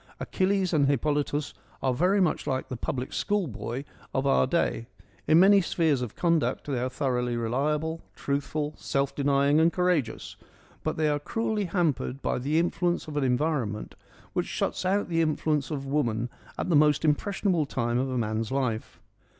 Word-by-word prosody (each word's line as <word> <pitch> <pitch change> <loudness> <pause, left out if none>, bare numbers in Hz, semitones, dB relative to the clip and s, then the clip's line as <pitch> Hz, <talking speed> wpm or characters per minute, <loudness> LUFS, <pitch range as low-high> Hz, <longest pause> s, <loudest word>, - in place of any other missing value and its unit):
Achilles 190 -1 0
and 145 -3 +4
Hippolytus 145 +1 0 0.3
are 130 -1 +2
very 180 +9 +2
much 180 -4 +1
like 130 -1 -2
the 130 - -3
public 125 +2 -4
school 205 -3 0
boy 125 +1 -5 0.3
of 135 +1 +1
our 135 -1 +3
day; 130 -6 0 0.4
in 160 - +6
many 195 +2 +7
spheres 160 -6 +1
of 120 -4 -5
conduct 170 -3 +1
they 135 -4 -1
are 125 +1 -1
thoroughly 125 -3 -1
reliable: 150 +7 -1
truthful, 145 +2 -2
self 140 0 -1
denying 140 +1 +3
and 165 +1 +4
courageous: 175 -10 -1 0.4
but 155 - -2
they 155 -1 +2
are 145 -1 +1
cruelly 220 +5 -1
hampered 165 -7 0
by - - 0
the 145 +5 0
influence 175 0 0
of 150 - -7
an 145 - +1
environment 125 -5 -1 0.4
which - - -1
shuts - - -2
out 200 +2 +1
the 165 -2 +1
influence 155 -2 0
of 140 -3 -4
woman 120 -5 0 0.3
at - - -2
the 170 - +3
most 150 +1 +4
impressionable 175 +1 +1
time 120 -2 -1
of 135 +1 -1
a 130 - -2
man's 110 0 -1
life. 125 -5 -2
145 Hz, 170 wpm, -27 LUFS, 130-165 Hz, 0.4 s, many